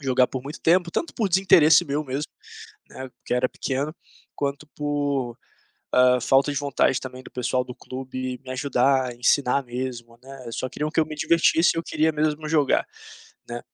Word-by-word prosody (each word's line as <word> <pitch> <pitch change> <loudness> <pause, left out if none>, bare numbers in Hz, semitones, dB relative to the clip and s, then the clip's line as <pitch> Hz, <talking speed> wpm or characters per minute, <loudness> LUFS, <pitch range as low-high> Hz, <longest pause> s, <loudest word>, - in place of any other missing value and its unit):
jogar 130 -2 +3
por 130 - -4
muito 145 +4 -8
tempo, 175 +1 +3
tanto 335 - -2
por 215 -4 0
desinteresse 170 -4 +5
meu 145 +2 -2
mesmo, 140 +2 -4 0.6
né, 130 - -8
porque - - -6
era 125 +1 +2
pequeno, 140 +3 -3 0.4
quanto 140 +1 -3
por, 145 -5 -2 0.6
ah, 125 0 +5
falta 135 +4 +3
de 145 - -3
vontade 140 -2 +1
também 130 0 -8
do - - -13
pessoal 125 +1 -1
do 125 -1 -9
clube 130 -1 -6
me 130 - -11
ajudar, 130 -1 +1
ensinar 135 +2 +2
mesmo, 120 -1 -6
né, 135 -2 -10
só 130 - -3
queriam 150 +4 -3
que 165 - 0
eu 160 - +3
me 155 0 -7
divertisse 165 +2 +3
e - - -4
eu 165 - -1
queria 160 0 +1
mesmo 155 0 -1
jogar, 150 -3 +2 0.6
né. 120 0 -6
135 Hz, 180 wpm, -24 LUFS, 125-150 Hz, 0.6 s, desinteresse